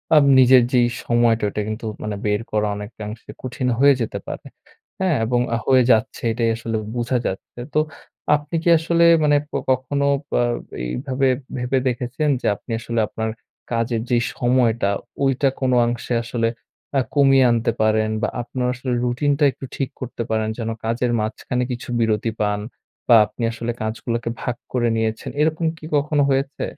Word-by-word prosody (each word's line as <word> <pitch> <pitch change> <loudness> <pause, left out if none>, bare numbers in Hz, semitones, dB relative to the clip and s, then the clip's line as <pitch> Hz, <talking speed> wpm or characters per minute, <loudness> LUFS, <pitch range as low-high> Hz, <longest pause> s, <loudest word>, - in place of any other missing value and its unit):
আম 150 - +6
নিজের 130 0 +7
যেই 120 -1 +4 0.2
সময়টা 120 -2 +2
ঐটা 105 - -3
কিন্তু 110 +2 -5 0.2
মানে 105 -1 -3
বের 105 +1 +1
করা 105 0 +1
অনেকাংশে 105 +1 -8
কঠিন 125 0 -3
হয়ে 140 0 +7
যেতে 115 - -3
পারে, - - -6 0.5
হ্যাঁ? 185 -5 +2
এবং 120 +1 +1 0.3
হয়ে 130 -2 +5
যাচ্ছে 110 -1 +1
এটাই 115 0 0
আসলে 115 0 -4 0.2
বোঝা 120 +1 0
যাচ্ছে। 95 +5 -6
তো 155 - +3 0.6
আপনি 150 +2 -5
কি 170 - +2
আসলে 170 +1 +2 0.2
মানে 145 -1 +4 0.2
ক - - -46 0.2
কখনো 135 +2 0 0.3
বা - - +2 0.4
এইভাবে 130 - -1 0.3
ভেবে 125 +2 0
দেখেছেন 125 +5 -1
যে - - -7
আপনি 115 - -11
আসলে 115 0 -2
আপনার 110 0 -3 0.4
কাজের 115 -1 0
যে 120 - +3 0.2
সময়টা 120 -4 +2 0.3
ঐটা 135 +1 +2
কোন 130 -1 +1
অংশে 120 +1 -2
আসলে 115 -1 0 0.5
আ - - +3
কমিয়ে 135 -2 +5
আনতে 115 0 +1
পারেন 110 0 +2
বা - - +1
আপনার 125 +1 -3
আসলে 125 +1 -4
রুটিনটা 140 +4 +1
একটু 135 - -9
ঠিক 135 -2 -2
করতে 120 -2 -4
পারেন 110 0 0
যেন 115 -1 -3 0.2
কাজের 120 +2 0
মাঝখানে 125 +3 -2
কিছু 120 0 -6
বিরতি 110 0 +1
পান? 105 -1 0 0.5
বা 120 - +7
আপনি 105 +3 -7
আসলে 115 +1 -3
কাজগুলাকে 115 +2 -3
ভাগ 120 - -2 0.2
করে 120 -2 +2
নিয়েছেন। 110 0 -2
এরকম 160 +2 +1
কি 155 - -11
কখনো 145 0 +2
হয়েছে? 135 +1 -1
120 Hz, 165 wpm, -21 LUFS, 110-130 Hz, 0.6 s, নিজের